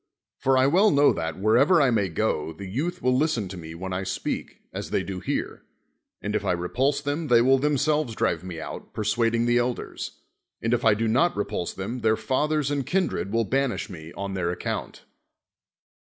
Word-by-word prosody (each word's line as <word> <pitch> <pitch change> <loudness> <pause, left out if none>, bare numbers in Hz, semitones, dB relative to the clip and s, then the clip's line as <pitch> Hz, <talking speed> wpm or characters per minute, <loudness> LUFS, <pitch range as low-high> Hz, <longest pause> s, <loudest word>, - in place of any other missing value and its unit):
For 135 0 +3
I 130 - +5
well 185 +10 +5
know 145 -3 +5
that, 80 0 -3
wherever 120 - +4
I 135 -4 +4
may 105 -5 +1
go, 80 -4 -1
the 90 +5 -9
youth 140 - -3
will 125 0 +3
listen 130 -7 +1
to 95 - -7
me 80 -2 -8
when 95 +2 -5
I 90 - -1
speak, 95 -1 -4
as - - -5
they - - 0
do 95 -1 -5
here. - - -3 0.6
And - - -2
if - - 0
I - - +1
repulse 130 +12 0
them 145 +2 -2
they 120 -3 +6
will 130 +3 +4
themselves 150 -2 +1
drive 85 -4 0
me 90 -3 -6
out, - - -8
persuading 115 +2 +1
the 120 0 +3
elders; 120 0 -4 0.4
and 115 +1 0
if 120 - +1
I 110 -2 +5
do 115 +2 0
not 135 +9 +2
re 105 - 0
pulse 100 -4 -3
them, 105 +7 -4
their 110 -1 +2
fathers 150 +1 0
and 140 -1 0
kindred 180 - -1
will 115 +1 +2
ban 135 +2 +1
ish - - -5
me 80 -2 -9
on 100 0 -4
their 90 -2 -1
account. 90 - -4
115 Hz, 205 wpm, -25 LUFS, 95-140 Hz, 0.6 s, they